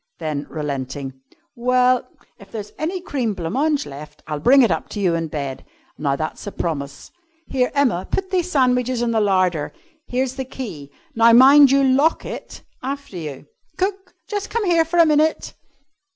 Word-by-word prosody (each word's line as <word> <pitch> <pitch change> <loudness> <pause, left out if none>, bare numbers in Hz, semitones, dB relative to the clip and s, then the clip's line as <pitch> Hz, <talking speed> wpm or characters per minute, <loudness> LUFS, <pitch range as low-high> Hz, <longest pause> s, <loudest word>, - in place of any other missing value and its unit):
Then, 155 -3 -4
relenting, 135 -2 -5 0.3
"Well, 250 +1 +2 0.3
if - - -15
there's 210 -2 -6
any 350 +4 -2
cream 250 - -2
blanc 170 -1 -4
mange 295 +2 +1
left 145 +1 -11
I'll 150 -1 -4
bring 265 - +6
it 230 - +3
up - - -2
to 210 - -6
you 185 -4 +2
in 165 -1 -1
bed. 140 -4 -5 0.3
Now 140 -2 -1
that's 155 +7 -5
a - - -3
promise. 140 -6 -5 0.3
Here, 250 -2 0
Emma, 245 -11 +1
put 380 -1 -2
these 365 -2 0
sandwiches 250 -3 +2
in 235 - 0
the 225 -1 +2
larder. 185 -6 +1 0.4
Here's 260 +1 -2
the 265 - -3
key! 200 - -8 0.2
Now 230 -1 +5
mind 275 +3 +8
you 275 +1 +4
lock 275 +4 +2
it - - -8 0.2
after 275 -4 -6
you!" 155 -5 -7 0.3
"Cook! 385 0 -3
Just 410 -2 -4
come 465 -2 -1
here 335 -3 +3
for 340 +2 -2
a 335 - +7
minute." 310 +1 +1
245 Hz, 175 wpm, -21 LUFS, -, 0.4 s, mind